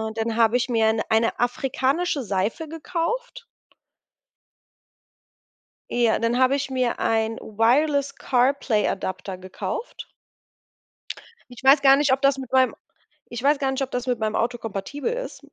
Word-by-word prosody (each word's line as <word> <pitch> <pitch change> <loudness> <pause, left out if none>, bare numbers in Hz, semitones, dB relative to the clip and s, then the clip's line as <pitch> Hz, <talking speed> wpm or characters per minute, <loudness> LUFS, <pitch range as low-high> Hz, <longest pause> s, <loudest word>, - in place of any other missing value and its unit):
dann 225 0 -2
habe 230 +1 +3
ich 250 - -1
mir 225 -3 +2
'ne 220 0 -1
eine 225 +1 +1
afrikanische 270 +5 0
Seife 205 - -2
gekauft. 455 +10 -4 2.5
Ja, 235 -2 +2
dann 230 +1 +1
habe 260 +1 +4
ich 280 -1 -2
mir 255 -2 -1
ein 225 0 +1
Wireless-CarPlay-Adapter 245 -5 0
gekauft. 185 - -6 1.4
Ich 245 +2 -13
weiß 275 +1 +6
gar 270 0 +7
ob 265 +1 +1
das 275 0 +3
mit 260 -3 -8
meinem 260 -1 +3 0.5
ich 240 0 -6
weiß 285 +3 +3
gar 270 -1 -1
nicht, 265 +1 -3
ob 265 - -2
das 245 0 -3
mit 250 -2 -1
meinem 215 -1 -1
Auto 240 +1 0
kompatibel 225 - -4
ist. - - -6
255 Hz, 135 wpm, -23 LUFS, 225-280 Hz, 2.5 s, gar